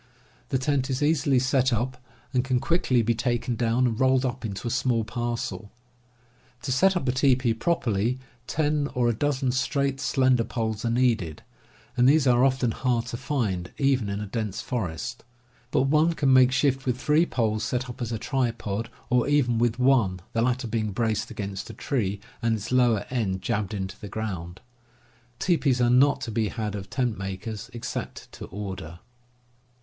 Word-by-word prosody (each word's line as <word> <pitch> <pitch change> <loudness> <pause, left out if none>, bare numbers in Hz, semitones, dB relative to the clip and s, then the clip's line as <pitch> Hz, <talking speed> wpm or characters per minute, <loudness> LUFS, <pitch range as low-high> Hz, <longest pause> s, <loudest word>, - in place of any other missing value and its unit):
The 130 - +1
tent 135 0 0
is 130 +2 -1
easily 145 -3 +3
set 130 0 +2
up, 120 +3 -1 0.4
and 125 -1 +2
it - - -10
can 130 -2 +2
quickly 135 -4 +2
be 115 +2 +2
taken 120 +1 -1
down 120 +2 +1
and 115 -2 -1
rolled 130 0 +3
up 130 0 -3
into 105 +1 -4
a - - -1
small 120 -2 +1
parcel. 120 -1 -4 0.9
To 135 - -2
set 190 +8 +4
up 140 - -3
a - - +4
teepee 130 -3 +3
properly, 115 -4 0 0.3
ten 150 -1 +1
or 125 -1 +2
a - - +2
dozen 135 +1 0
straight, 135 +1 0
slender 130 -3 +2
poles 110 -2 -3
are 115 - 0
needed, 115 -10 +1 0.5
and 125 +1 +5
these 150 0 +4
are 125 -1 +4
often 130 -3 +2
hard 120 -1 0
to - - -4
find, 110 -10 -2
even 135 -6 +2
in 100 0 -2
a 105 - -4
dense 105 0 -3
forest. 95 -12 -4 0.5
But 130 0 +2
one 155 +4 +3
can 140 -4 +2
make 130 -1 +6
shift 135 0 +1
with 125 -1 +1
three 155 +3 +3
poles 110 -3 0
set 125 +3 -1
up 120 0 -9
as 120 -1 -2
a 115 - -1
tripod, 115 -4 -2 0.2
or 125 0 +3
even 130 -6 +2
with 120 -1 +1
one, 125 -8 +3
the 115 - +1
latter 125 +1 0
being 110 -2 -2
braced 110 -1 -1
against 100 -3 -5
a - - -8
tree, 105 -8 -1 0.2
and 115 -1 +2
its 110 +2 -6
lower 120 -5 +3
end 95 -7 -1
jabbed 105 -2 -1
into 95 0 -5
the 105 - -8
ground. 95 -5 -5 0.8
Teepees 140 -5 +2
are 120 -1 +3
not 135 +3 +4
to 115 - -4
be 110 0 0
had 105 -2 -3
of 100 -2 -6
tent 120 -5 -1
makers, 100 +4 -5
except 120 -1 -6
to - - -8
order. 95 -4 -7
120 Hz, 185 wpm, -26 LUFS, 110-130 Hz, 0.9 s, make